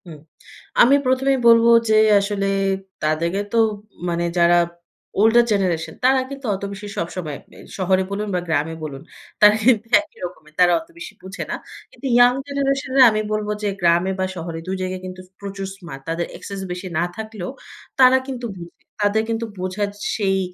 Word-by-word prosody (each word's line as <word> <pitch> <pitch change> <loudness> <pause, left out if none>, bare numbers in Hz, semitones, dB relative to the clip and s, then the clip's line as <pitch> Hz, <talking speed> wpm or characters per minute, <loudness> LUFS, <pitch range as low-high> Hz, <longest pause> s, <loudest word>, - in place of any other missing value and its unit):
হুম। 160 -4 -11 0.6
আমি 270 +4 +7
১ম 260 +1 +1
এই 265 - 0
বলব 230 0 +7 0.2
যে, 215 - +4 0.2
আসলে 200 0 -2 0.6
তাদেরকে 165 +5 0
তো 235 - 0 0.5
মানে 170 0 -1
যারা 175 0 +5 0.6
ওল্ডার 225 +3 +6
জেনারেশন। 170 -5 0
তারা 265 +1 +5
কিন্তু 275 -1 -8
অত 195 - -9
বেশি 205 +1 -8
সবসময় 165 -3 -4
মে - - -16 0.2
শহরে 190 0 +2
বলুন, 210 +2 -3
বা - - +1
গ্রামে 155 0 0
বলুন 140 -3 -6 0.4
তারা 210 0 +8
কিন্তু 230 -2 +4 0.2
একই 310 - -18
রকমের, 155 -4 -11
তারা 180 -1 +6
অত 325 - -13
বেশি 340 - -8
বুঝে 190 +2 -6
না। - - -1 0.4
কিন্তু 255 - -13
ইয়ং 245 0 +6
জেনারেশনের 275 -1 +2
আমি 215 0 0
বলবো 210 0 -1
যে, - - +1
গ্রামে 175 +2 +3
বা 190 - +1
শহরে 165 -1 -5
দুই 190 - -2
জায়গায় 185 0 -3
কিন্তু 185 0 -8 0.2
প্রচুর 200 -1 -6
স্মার্ট 170 -8 -10
তাদের 170 +1 -1
অ্যাক্সেস 200 -1 -8
বেশি 180 +1 -5
না 170 - +2
থাকলেও, 215 -4 -6 0.5
তারা 260 0 +7
কিন্তু 250 -3 -4
বুঝে। 170 -1 -11 0.3
তাদের 215 +2 +2
কিন্তু 230 0 -1
বোঝার 185 +3 -2 0.3
সেই 195 -3 +1
195 Hz, 170 wpm, -21 LUFS, 175-230 Hz, 0.6 s, তারা